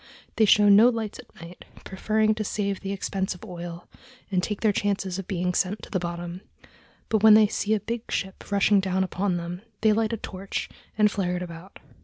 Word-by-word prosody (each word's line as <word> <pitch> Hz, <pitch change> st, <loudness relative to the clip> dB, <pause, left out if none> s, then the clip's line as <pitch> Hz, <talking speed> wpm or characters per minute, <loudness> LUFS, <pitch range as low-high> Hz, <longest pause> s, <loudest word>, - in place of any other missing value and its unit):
They 220 Hz, -, +5 dB
show 210 Hz, 0 st, +5 dB
no 205 Hz, +4 st, +7 dB
lights 225 Hz, -3 st, -4 dB
at 245 Hz, -, -15 dB
night, 170 Hz, +1 st, -11 dB, 0.2 s
preferring 215 Hz, +3 st, +1 dB
to 215 Hz, 0 st, -3 dB
save 200 Hz, -1 st, -2 dB
the 195 Hz, -, -5 dB
expense 190 Hz, -1 st, -2 dB
of 180 Hz, -, -12 dB
oil, 175 Hz, -1 st, -8 dB, 0.4 s
and 185 Hz, -2 st, +2 dB
take 210 Hz, +2 st, -3 dB
their 215 Hz, -, +3 dB
chances 195 Hz, -2 st, -1 dB
of 190 Hz, -, -7 dB
being 180 Hz, -2 st, -1 dB
sent 190 Hz, +4 st, -1 dB
to -, -, -11 dB
the 190 Hz, -, 0 dB
bottom; 175 Hz, +1 st, -5 dB, 0.7 s
but 220 Hz, -2 st, +2 dB
when 220 Hz, 0 st, +8 dB
they 215 Hz, 0 st, +7 dB
see 210 Hz, +1 st, 0 dB
a -, -, -1 dB
big 230 Hz, +3 st, -5 dB
ship 190 Hz, +1 st, -4 dB
rushing 200 Hz, 0 st, +4 dB
down 190 Hz, 0 st, 0 dB
upon 185 Hz, 0 st, -1 dB
them, 175 Hz, +1 st, -6 dB, 0.2 s
they 215 Hz, -1 st, +4 dB
light 220 Hz, 0 st, 0 dB
a 230 Hz, -, -2 dB
torch 195 Hz, -1 st, -5 dB, 0.3 s
and 210 Hz, -1 st, +4 dB
flare 180 Hz, -4 st, -1 dB
it 180 Hz, -, -3 dB
about. 170 Hz, +2 st, -10 dB
195 Hz, 210 wpm, -25 LUFS, 180-215 Hz, 0.7 s, when